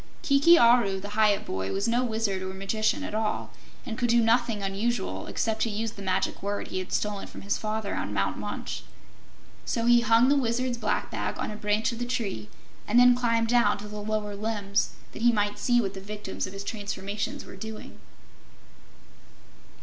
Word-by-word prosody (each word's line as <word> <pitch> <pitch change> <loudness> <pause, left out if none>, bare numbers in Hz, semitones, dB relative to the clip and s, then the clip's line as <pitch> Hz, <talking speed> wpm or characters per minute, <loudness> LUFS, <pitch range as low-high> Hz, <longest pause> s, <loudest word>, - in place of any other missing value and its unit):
Kiki 335 +2 +6
Aru, 235 -6 +5
the 205 +2 -7
Hyup 210 -1 +2
boy, 95 0 -3
was 200 +3 -1
no 240 +2 +2
wizard 220 -5 -1
or 190 0 -5
magician 205 +3 0
at - - -5
all, 215 0 -1 0.3
and 225 -4 -5
could 240 - +1
do 235 +1 +5
nothing 230 -2 +2
unusual 195 - -2
except 220 -1 -1
to 230 - +2
use 220 +1 -2
the 200 - -11
Magic 190 0 -1
Word 200 +1 -3
he 185 - -2
had 185 - -6
stolen 210 -1 -1
from - - -10
his 200 - -1
father 215 -1 -3
on - - -3
Mount - - 0
Munch. - - -5 0.8
So 230 -1 -1
he 240 0 +6
hung 230 +2 +5
the 280 - +4
Wizard's 250 -1 0
black - - -1
bag - - -3
on - - -3
a - - -6
branch 210 +3 0
of 235 - -7
the 245 - -1
tree 195 - -3 0.4
and 215 - +2
then 245 0 +8
climbed 230 -2 +1
down 240 -2 +4
to 205 +1 -8
the 210 0 -6
lower 210 -1 -2
limbs 205 -1 -1 0.2
that - - -9
he 240 +1 +5
might 205 -2 0
see 240 -1 +3
what 200 -4 -1
the 190 - -8
victims 205 -1 -5
of 185 - -9
his 195 0 -6
transformations 205 -1 -4
were - - -10
doing. 220 +3 -8
215 Hz, 195 wpm, -27 LUFS, 200-235 Hz, 0.8 s, then